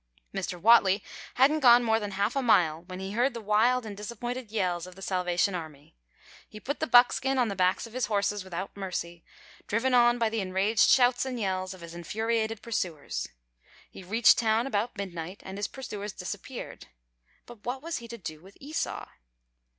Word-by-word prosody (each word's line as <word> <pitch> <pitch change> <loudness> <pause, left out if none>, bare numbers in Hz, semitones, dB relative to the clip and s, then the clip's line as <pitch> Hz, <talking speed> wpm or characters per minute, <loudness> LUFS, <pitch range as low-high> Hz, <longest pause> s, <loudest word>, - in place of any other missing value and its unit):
Mr. 180 - -4
Whatley 200 -1 +5 0.3
hadn't 285 +5 +4
gone 245 -3 +7
more 225 -1 +2
than 205 -2 -4
half 200 +7 0
a 275 - +1
mile 165 -10 +3
when 185 0 -7
he 190 +1 -5
heard 240 +4 +1
the - - -4
wild 225 +4 +2
and 210 -2 -6
disappointed 235 +3 -6
yells 180 -5 -1
of 185 - -12
the 195 - -13
Salvation 180 +1 0
Army. 155 - -8 0.5
He 215 - -10
put 280 +7 -4
the 315 - -1
buckskin 260 +2 +4
on 245 -3 +2
the 200 - -3
backs 185 +2 +1
of 230 - -13
his 255 0 -1
horses 205 -1 0
without 190 +1 -6
mercy, 175 -3 -5 0.4
driven 240 +5 0
on 240 0 +5
by 230 -2 +1
the 225 0 -2
enraged 195 +3 +2
shouts 245 -1 +4
and 260 -2 -4
yells 185 -2 -2
of 185 - -15
his 170 0 -9
infuriated 220 +5 -2
pursuers. 180 -10 -3 0.6
He - - -11
reached 215 +5 +4
town 225 +1 +2
about 225 -3 -2
midnight, 180 -2 -6
and 190 +1 -7
his 205 - -1
pursuers 210 -6 -7
disappeared. - - -7 0.6
But 240 -3 -14
what 260 +3 -4
was 335 0 -3
he 235 - -9
to 235 0 -8
do 155 -6 -8
with 195 +3 -17
Esau? 300 +4 -4
210 Hz, 190 wpm, -28 LUFS, 185-240 Hz, 0.6 s, gone